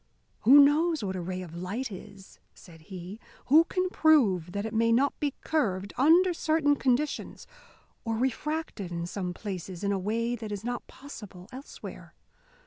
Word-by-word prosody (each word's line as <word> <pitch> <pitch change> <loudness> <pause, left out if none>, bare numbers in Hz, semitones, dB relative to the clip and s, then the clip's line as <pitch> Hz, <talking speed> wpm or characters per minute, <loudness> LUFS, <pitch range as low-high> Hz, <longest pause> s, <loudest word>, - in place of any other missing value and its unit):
"Who 260 +6 +7
knows 310 +1 +3
what 190 -1 -3
a 185 - -3
ray 185 +1 -4
of 170 -3 -11
light 205 +8 -4
is?" 190 0 -12 0.2
said 165 -3 -15
he. 185 +2 -8 0.3
"Who 315 +4 +7
can 370 0 -1
prove 205 - +3
that 200 +1 -3
it 220 - -5
may 230 +1 +2
not 270 +5 +3
be 290 -2 -1
curved, 200 -11 -1
under 335 +8 +5
certain 310 -3 +2
conditions, 270 +2 -1 0.6
or 225 -1 -2
refracted 265 - -2
in 170 0 -3
some 180 0 -4
places 185 -1 -6
in 200 - +1
a 195 - 0
way 230 +5 -1
that 220 -2 -7
is 205 0 -5
not 245 +1 -4
possible 205 -10 -11
elsewhere? 265 +3 -10
225 Hz, 165 wpm, -28 LUFS, 185-285 Hz, 0.6 s, Who